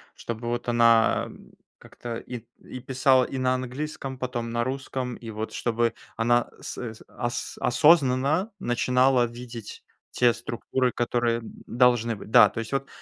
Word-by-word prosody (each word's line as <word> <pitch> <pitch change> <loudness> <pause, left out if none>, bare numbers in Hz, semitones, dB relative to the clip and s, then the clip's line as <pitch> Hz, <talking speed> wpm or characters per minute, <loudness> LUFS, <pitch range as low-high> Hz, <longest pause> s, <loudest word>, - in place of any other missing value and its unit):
Чтобы 115 0 -6
вот 120 +1 -3
она, 115 -1 +4
м, - - -15 0.3
как-то 120 -1 -8
и 120 -1 -8 0.2
и 130 - -9
писала 130 0 +3
и 135 - -4
на 130 0 +2
английском, 130 +2 -5
а - - -16
потом 125 -2 -3
на 120 0 0
русском? 130 -1 -4
И 115 - -9
вот 110 0 -5
чтобы 120 0 0 0.2
она 120 +1 +2
сэ 115 -3 -6
сэ - - -16
ос 120 -1 -4
осознанно 145 - +3
начинала 125 -2 +2
видеть 120 -2 -9 0.3
те 120 -1 +3
структуры, 120 +3 -2
которые, 120 -1 0
м, 115 - -10 0.2
должны 120 -1 +3
быть. 100 - -11
Да, 105 - +8
то 110 - -6
есть 115 - -5
вот 135 0 -1
120 Hz, 160 wpm, -26 LUFS, 115-130 Hz, 0.3 s, Да